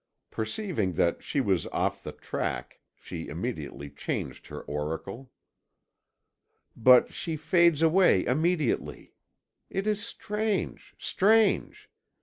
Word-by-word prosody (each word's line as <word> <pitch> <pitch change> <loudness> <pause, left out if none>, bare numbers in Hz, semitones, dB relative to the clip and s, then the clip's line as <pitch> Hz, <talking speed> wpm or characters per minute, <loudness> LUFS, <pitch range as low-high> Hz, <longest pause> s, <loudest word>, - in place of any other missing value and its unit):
Perceiving 110 - -2
that 85 +1 +1
she 145 - -2
was 95 -9 +1
off - - -1
the - - -6
track, - - -4 0.2
she 80 -2 -8
immediately 75 - -5
changed 70 - -5
her - - -7
oracle: 80 - -5 1.5
"But 125 +2 +6
she 160 -2 -3
fades 170 0 +3
away 165 - +4
immediately. 155 +1 0 0.6
It 195 +1 -2
is 210 -1 0
strange, 210 -3 -3
strange! 220 +3 +2
145 Hz, 105 wpm, -28 LUFS, -, 1.5 s, But